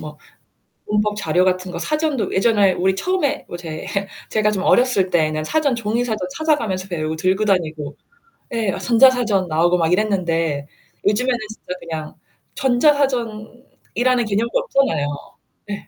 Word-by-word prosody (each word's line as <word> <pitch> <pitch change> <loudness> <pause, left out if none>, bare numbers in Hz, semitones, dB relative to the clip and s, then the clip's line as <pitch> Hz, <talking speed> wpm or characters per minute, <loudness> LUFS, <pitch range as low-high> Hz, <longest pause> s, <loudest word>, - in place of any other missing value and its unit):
뭐 - - -9 0.7
문법 210 0 +1
자료 185 -3 +1
같은 185 0 0
거 - - -5
사전도 305 -5 -1
예전에 200 -2 +3
우리 190 +2 +1
처음에 300 - -1
뭐 175 - -6
제 160 -3 -7 0.4
제가 215 -1 +1
좀 195 -2 -2
어렸을 245 -7 +3
때에는 155 -2 +1
사전 285 - +1
종이 230 +1 -1
사전 215 -6 -3
찾아가면서 230 -13 0
배우고 160 -3 -3
들고 190 +5 +1
다니고 155 -7 -1 0.6
예. 220 -4 0
어 - - -4
전자사전 235 -6 +4
나오고 170 +3 +3
막 165 -1 +1
이랬는데 170 -7 0 0.4
요즘에는 245 +4 +2
진짜 220 -4 -7
그냥 160 -2 -6 0.4
전자사전이라는 250 -2 0
개념도 215 - 0
없잖아요. 270 - +1 0.6
네. 205 -1 -6
210 Hz, 325 characters per minute, -20 LUFS, 180-245 Hz, 0.7 s, 전자사전